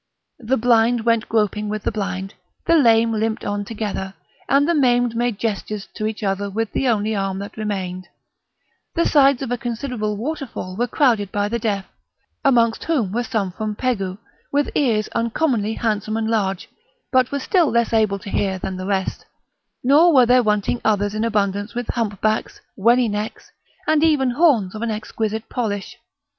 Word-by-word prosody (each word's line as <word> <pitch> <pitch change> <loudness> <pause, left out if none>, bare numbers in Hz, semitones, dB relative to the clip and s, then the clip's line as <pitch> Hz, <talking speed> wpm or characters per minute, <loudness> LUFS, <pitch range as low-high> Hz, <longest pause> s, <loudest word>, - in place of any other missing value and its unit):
The 255 +2 0
blind 235 0 +3
went 230 -1 +1
groping 210 -1 0
with 215 0 -3
the - - 0
blind, 195 -2 -4 0.3
the - - +3
lame 230 -6 +4
limped 220 +1 -1
on 205 0 -2
together, 200 -3 -4 0.3
and 280 +2 +4
the 340 - +3
maimed 245 -5 +2
made 240 -2 0
gestures 210 -2 -3
to 215 -1 -2
each 220 0 -5
other 200 0 -1
with 220 +2 -2
the 270 - 0
only 215 -2 +1
arm 195 -1 -2
that 200 +1 -7
remained; 185 -4 -4 0.9
the 335 - +2
sides 275 -2 +4
of 255 - -4
a 245 - -1
considerable 235 -3 -3
waterfall 250 -7 -5
were 240 +4 0
crowded 225 -7 +2
by 205 0 0
the 235 +3 -2
deaf, 205 -3 -1 0.6
amongst 235 -4 +3
whom 260 - 0
were 235 +4 0
some 215 -6 -2
from 215 +3 -4
Pegû 195 -7 -2 0.3
with 285 0 +1
ears 225 -7 +1
uncommonly 230 -2 0
handsome 215 -1 -1
and 225 0 -1
large, 195 -4 -1 0.4
but 255 -1 +3
were 280 - -1
still 335 +2 +2
less 235 0 +1
able 215 -3 +2
to 195 0 -9
hear 190 -2 0
than 185 0 -5
the 185 +1 -5
rest; 190 -2 -2 0.6
nor 300 +7 +6
were 260 -5 +6
there 250 +1 +5
wanting 210 +1 0
others 205 -1 +1
in 215 +1 -1
abundance 205 -1 -1
with 245 -1 -3
humpbacks, 215 -1 -1 0.2
wenny 235 +4 +3
necks, 210 +1 -5 0.3
and 310 0 +3
even 290 -6 +3
horns 245 - +3
of 215 - -7
an 235 - -1
exquisite 220 0 -3
polish. 220 -1 -4
220 Hz, 175 wpm, -21 LUFS, 205-245 Hz, 0.9 s, nor